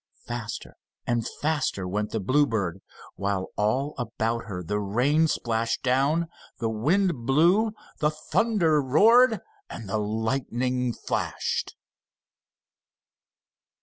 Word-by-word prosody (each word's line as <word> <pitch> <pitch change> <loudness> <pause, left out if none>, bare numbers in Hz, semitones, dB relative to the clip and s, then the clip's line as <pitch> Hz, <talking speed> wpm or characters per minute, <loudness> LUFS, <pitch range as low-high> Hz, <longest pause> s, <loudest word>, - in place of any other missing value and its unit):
Faster 115 -2 -6 0.3
and 120 -1 0 0.2
faster 145 -11 0
went 105 +3 -2
the 110 - -2
Bluebird, 105 - +1 0.4
while 100 -1 -1
all 130 +8 0
about 115 -1 -2
her 90 -5 -5
the 105 +5 -2
rain 125 +11 +2
splashed 115 -4 -1
down, 140 +6 +2 0.3
the 115 -3 -1
wind 150 - +1
blew, 175 +11 +4 0.3
the 150 - +3
thunder 160 0 +1
roared, 225 - +5 0.3
and 115 - -8
the 100 +2 -1
lightning 120 +3 -1
flashed. - - -3
125 Hz, 105 wpm, -26 LUFS, 110-150 Hz, 0.4 s, roared